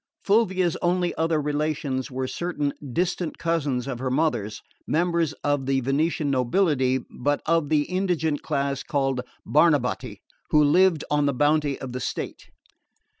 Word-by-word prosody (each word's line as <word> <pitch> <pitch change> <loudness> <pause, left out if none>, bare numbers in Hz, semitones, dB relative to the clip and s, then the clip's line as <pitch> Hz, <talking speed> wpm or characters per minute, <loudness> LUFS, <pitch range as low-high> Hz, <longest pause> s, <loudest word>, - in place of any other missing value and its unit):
Fulvia's 190 -5 +2
only 175 0 0
other 160 -1 +1
relations 145 -2 -2
were 130 0 -3
certain 150 -3 -2 0.2
distant 175 +2 -1
cousins 150 -7 -1
of 130 -3 -4
her 130 0 -2
mother's, 125 -7 -1 0.2
members 170 -2 +1
of 145 -2 0
the 135 -1 +2
Venetian 145 +3 0
nobility, 130 -1 +2
but 145 +3 -1
of 165 -3 +1
the 150 -2 +3
indigent 175 -4 -1
class 140 -2 -1
called 135 -3 -1 0.2
Barnabotti, 150 -5 +2 0.3
who 150 0 +5
lived 170 +1 +4
on 145 -1 +2
the 140 - 0
bounty 145 0 +2
of 135 - -6
the 125 - -4
state. - - -5
150 Hz, 140 wpm, -25 LUFS, 135-165 Hz, 0.3 s, who